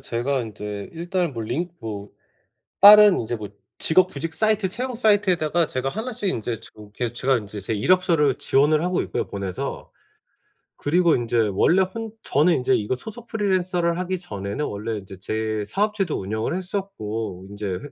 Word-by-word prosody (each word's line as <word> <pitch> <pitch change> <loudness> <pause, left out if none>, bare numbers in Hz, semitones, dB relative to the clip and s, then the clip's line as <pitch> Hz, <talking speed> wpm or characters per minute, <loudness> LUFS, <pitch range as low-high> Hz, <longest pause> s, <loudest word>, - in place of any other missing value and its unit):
제가 125 +3 -1
인제 105 -2 -6
일단은 175 0 -2
뭐 115 -2 -4
링 150 +11 -2
뭐 105 -2 -6 0.7
다른 210 -1 +9
이제 120 +1 -3
뭐 105 -2 -7 0.3
직업 185 +3 +4
구직 160 +3 -4
사이트 215 -3 +2
채용 250 +6 -4
사이트에다가 185 -7 +2
제가 130 -1 -2
1 220 - -4
씩 205 -2 -2
인제 115 -6 -2
저 - - -13
이렇게 105 +3 -5
제가 130 +2 +1
인제 105 -1 -7
제 100 - -3
이력서를 160 - +3
지원을 150 +3 +3
하고 180 0 0
있고요 - - -3
보내서. 95 -2 -5 0.9
그리고 170 +2 +3
인제 120 -1 -1 0.2
원래 175 - +4
혼 220 +4 -4
저는 155 +6 +3
인제 125 - +2
이거 105 +4 0
소속 220 - -10
프리랜서를 185 -5 0
하기 185 0 -2
전에는 100 - -4
원래 110 0 -4
이제 95 -1 -10
제 110 +1 -2
사업체도 200 - -1
운영을 110 +7 -2
했었고 115 - -4
인제 100 +1 -6
해 90 -1 -2
145 Hz, 345 characters per minute, -23 LUFS, -, 0.9 s, 다른